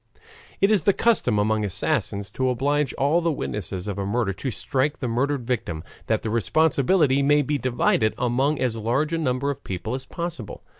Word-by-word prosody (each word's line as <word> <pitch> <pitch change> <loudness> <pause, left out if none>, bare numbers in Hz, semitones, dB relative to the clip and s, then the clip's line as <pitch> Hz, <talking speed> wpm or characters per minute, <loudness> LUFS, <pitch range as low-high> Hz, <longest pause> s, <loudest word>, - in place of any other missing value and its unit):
It 195 +2 +4
is 210 -5 +4
the 200 - +5
custom 200 - +2
among 110 +1 +1
assassins 100 +1 -1
to 130 +4 0
oblige 140 +3 +1
all 150 +5 +2
the 165 0 +1
witnesses 100 - -4
of 100 -1 -3
a 100 - -2
murder 105 -1 0
to 130 - -4
strike 135 +4 -1
the 125 - -3
murdered 125 +2 -1
victim, 95 -10 -2 0.2
that 110 -1 0
the 110 - -2
responsibility 140 - +2
may 145 +1 +4
be 145 +1 -1
divided 120 -3 +1
among 130 +5 +1
as 125 -3 0
large 120 +8 0
a 165 - 0
number 140 -1 0
of 140 - -8
people 95 +5 -4
as 130 0 -5
possible. 170 - -6
130 Hz, 190 wpm, -24 LUFS, 110-145 Hz, 0.2 s, the